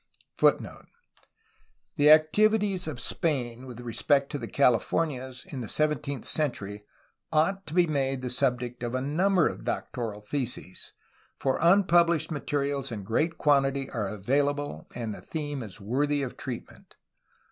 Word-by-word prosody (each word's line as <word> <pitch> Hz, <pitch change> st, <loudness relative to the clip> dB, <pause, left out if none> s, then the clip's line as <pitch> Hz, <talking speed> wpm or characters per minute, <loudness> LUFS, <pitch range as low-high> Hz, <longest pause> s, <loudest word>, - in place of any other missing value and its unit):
io -, -, +8 dB
^° -, -, -10 dB, 1.1 s
The 150 Hz, -2 st, +5 dB
activities 195 Hz, +5 st, +4 dB
of 145 Hz, -6 st, -5 dB
Spain 130 Hz, -4 st, -2 dB
with 125 Hz, -2 st, -9 dB
re 120 Hz, -2 st, -6 dB
spect 140 Hz, +2 st, +2 dB
to 145 Hz, -, -3 dB
the 115 Hz, -, -5 dB
Californias 130 Hz, +1 st, +1 dB
in 150 Hz, -9 st, -6 dB
the 115 Hz, -, -5 dB
sev 155 Hz, 0 st, +2 dB
enteenth 140 Hz, -2 st, -4 dB
century 105 Hz, -9 st, -2 dB, 0.5 s
ought 190 Hz, +5 st, +1 dB
to 155 Hz, -, -6 dB
be 180 Hz, -1 st, +5 dB
made 135 Hz, -4 st, -1 dB
the 125 Hz, -, -2 dB
subject 125 Hz, -2 st, 0 dB
of 120 Hz, +1 st, -3 dB
a 130 Hz, -, 0 dB
number 175 Hz, +6 st, +2 dB
of -, -, -5 dB
doctoral 110 Hz, -5 st, -3 dB
theses, 120 Hz, -4 st, -3 dB, 0.4 s
for 135 Hz, -1 st, 0 dB
tmpublished 170 Hz, -2 st, +4 dB
materials 140 Hz, -2 st, -1 dB
in 105 Hz, -3 st, -5 dB
great 155 Hz, -, 0 dB
quantity 135 Hz, -2 st, +2 dB
are 110 Hz, -5 st, -2 dB
available 140 Hz, -, -1 dB
and 115 Hz, -3 st, -3 dB
the -, -, -9 dB
theme 145 Hz, -3 st, -4 dB
IS 110 Hz, -2 st, -8 dB
worthy 140 Hz, +7 st, 0 dB
of 130 Hz, -, -5 dB
treatment. 125 Hz, -4 st, -8 dB
140 Hz, 150 wpm, -28 LUFS, 120-155 Hz, 1.1 s, io